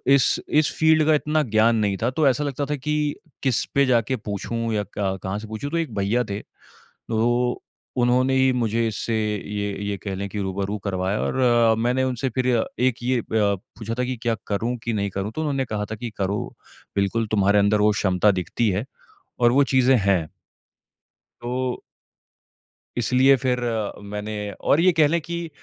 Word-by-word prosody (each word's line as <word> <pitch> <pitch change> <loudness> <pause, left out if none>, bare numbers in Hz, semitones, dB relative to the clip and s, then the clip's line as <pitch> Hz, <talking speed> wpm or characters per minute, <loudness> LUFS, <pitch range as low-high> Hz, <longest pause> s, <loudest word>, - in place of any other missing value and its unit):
इस 135 - +3
इस 155 0 +3
फ़ील्ड 160 -1 +4
का 155 - +5
इतना 150 +1 +1
ज्ञान 110 0 +3
नहीं 100 -3 0
था। 120 - +2
तो 150 +1 +2
ऐसा 135 +3 +2
लगता 145 0 -2
था 150 +1 -2
कि 150 +1 -1 0.3
किस 130 -3 +2
पे 140 0 +5
जाके 125 0 +2
पूछूँ 115 +1 -3
या 105 -1 0
क 95 -1 -1
कहाँ 95 +2 -2
से 110 - -9
पूछूँ? 110 +6 -5
तो 170 - 0
एक 160 -9 -2
भईया 105 +5 +1
थे 100 +1 -3 0.5
तो 120 +2 -1 0.4
उन्होंने 125 +2 +3
ही 130 0 +4
मुझे 115 -1 0
इससे 110 +1 -3
ये 105 -1 -2 0.2
ये 100 -1 -2
कह 100 -2 -3
लें 100 +1 -4
कि 105 - -5
रूबरू 100 +2 -2
करवाया 95 +1 -1
और 120 -3 +3
मैंने 125 +3 +1
उनसे 130 0 -1
फ़िर 130 +1 -1 0.3
एक 125 -1 +2
ये 125 0 +1
अ, - - -5
पूछा 110 +1 -1
था - - +2
कि, 125 -1 -3
"क्या 115 0 -1
करूँ 115 +4 -1
कि 115 - -1
नहीं 100 -1 -1
करूँ?" 100 +3 -4
तो 155 - -4
उन्होंने 140 -4 -1
कहा 105 -2 -3
था 110 - -2
कि 120 +1 -5
"करो। 100 +1 -2 0.4
बिल्कुल, 105 +3 0
तुम्हारे 100 -1 +3
अंदर 100 +1 +3
वो 105 - +5
क्षमता 100 -1 +2
दिखती 100 +4 -1
है 100 +5 -1 0.6
और 120 0 +5
वो 140 +2 +5
चीज़ें 130 0 +5
हैं। 95 -5 +1 1.1
तो 125 +1 -2 1.2
इसलिए 130 +3 +4
फिर 125 0 0
अ, 110 -3 -1
मैंने 105 0 -5
और 140 - +1
ये 185 - +5
कह 155 -2 +4
लें 170 +3 +1
कि 170 0 -5
115 Hz, 185 wpm, -23 LUFS, 105-130 Hz, 1.2 s, का